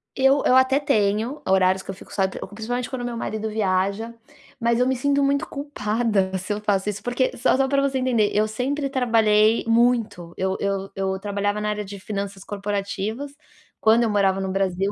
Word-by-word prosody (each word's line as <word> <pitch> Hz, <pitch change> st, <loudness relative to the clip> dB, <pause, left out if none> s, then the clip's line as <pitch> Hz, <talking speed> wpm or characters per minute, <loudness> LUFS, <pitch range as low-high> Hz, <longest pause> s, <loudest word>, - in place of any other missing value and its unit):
Eu 270 Hz, +1 st, +3 dB
eu 255 Hz, -, +5 dB
até 260 Hz, +1 st, +4 dB
tenho 220 Hz, +1 st, 0 dB
horários 190 Hz, 0 st, +3 dB
que -, -, -17 dB
eu -, -, -2 dB
fico -, -, -14 dB
só, 190 Hz, -1 st, +2 dB
pr -, -, -7 dB
principalmente 240 Hz, +3 st, -3 dB
quando 245 Hz, -2 st, -4 dB
meu 240 Hz, -1 st, -4 dB
marido 220 Hz, -1 st, -3 dB
viaja, 200 Hz, +2 st, -1 dB, 0.5 s
mas 235 Hz, 0 st, +2 dB
eu 250 Hz, -, +3 dB
me 260 Hz, -, +1 dB
sinto 280 Hz, +2 st, +1 dB
muito 280 Hz, 0 st, +1 dB
culpada 215 Hz, -8 st, -1 dB
se 190 Hz, +3 st, -6 dB
eu 210 Hz, -, -4 dB
faço 205 Hz, -1 st, 0 dB
isso, 205 Hz, 0 st, -5 dB
porque 245 Hz, +3 st, -1 dB
só 240 Hz, -, +3 dB
só 270 Hz, 0 st, +2 dB
pra 275 Hz, 0 st, +2 dB
você 275 Hz, -1 st, 0 dB
entender, 235 Hz, -5 st, +2 dB
eu 215 Hz, +1 st, +3 dB
sempre 275 Hz, +6 st, -2 dB
trabalhei 225 Hz, -4 st, +3 dB
muito, 230 Hz, -7 st, +1 dB
eu 190 Hz, 0 st, -1 dB
eu 195 Hz, -1 st, -2 dB
eu 190 Hz, 0 st, -1 dB
trabalhava 205 Hz, +1 st, -2 dB
na 210 Hz, -, -1 dB
área 210 Hz, -1 st, -3 dB
de 200 Hz, +1 st, -8 dB
finanças 200 Hz, -1 st, -5 dB
corporativas 205 Hz, +6 st, -4 dB, 0.5 s
quando 225 Hz, +2 st, +4 dB
eu 220 Hz, -, +1 dB
morava 195 Hz, -2 st, +2 dB
no 190 Hz, -1 st, -2 dB
Brasil, 195 Hz, 0 st, 0 dB
215 Hz, 195 wpm, -23 LUFS, 195-245 Hz, 0.5 s, eu